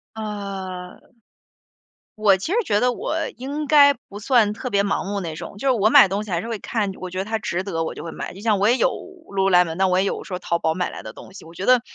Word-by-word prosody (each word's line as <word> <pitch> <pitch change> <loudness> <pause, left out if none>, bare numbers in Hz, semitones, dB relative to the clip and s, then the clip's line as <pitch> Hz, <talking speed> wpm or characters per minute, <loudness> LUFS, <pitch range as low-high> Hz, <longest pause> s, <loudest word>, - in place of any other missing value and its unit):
呃， 195 -4 -6 1.2
我 210 -3 +4
其 195 - -5
实 460 - +2
觉 205 - +2
得 250 +2 +2
我 470 - -3 0.2
应 285 +3 -4
该 285 -2 +7
不 205 -6 -12
算 220 -3 +3
特 250 +4 -5
别 200 -2 +2
盲 200 - -1
目 200 +1 -3
那 165 -4 -5
种， 200 - -8
就 275 - -3
是 - - +5
我 215 -3 +3
买 270 -4 +8
东 200 +3 -2
西 205 - -9
还 170 - 0
是 225 - -7
会 225 -3 -4
看 210 -4 -2
我 185 - -6
觉 185 +1 -5
得 190 - -2
它 220 +1 -1
值 185 -4 -2
得 165 -5 -2
我 - - -4
就 - - -9
会 165 - -6
买。 - - -6
就 195 - -11
像 210 -3 +2
我 205 +3 +3
也 245 - +3
有 - - +3 0.4
Lululemon， 180 -4 +2
那 190 +2 +2
我 185 0 +2
也 195 - +2
有 - - -2
说 180 -2 -5
淘 170 -2 -1
宝 160 0 +1
买 180 +1 -2
来 - - -9
的 - - -8
东 190 - -13
西， 200 - -12
我 165 - -13
觉 185 +3 -5
得 250 -2 +5
200 Hz, 330 characters per minute, -22 LUFS, 185-225 Hz, 1.2 s, 买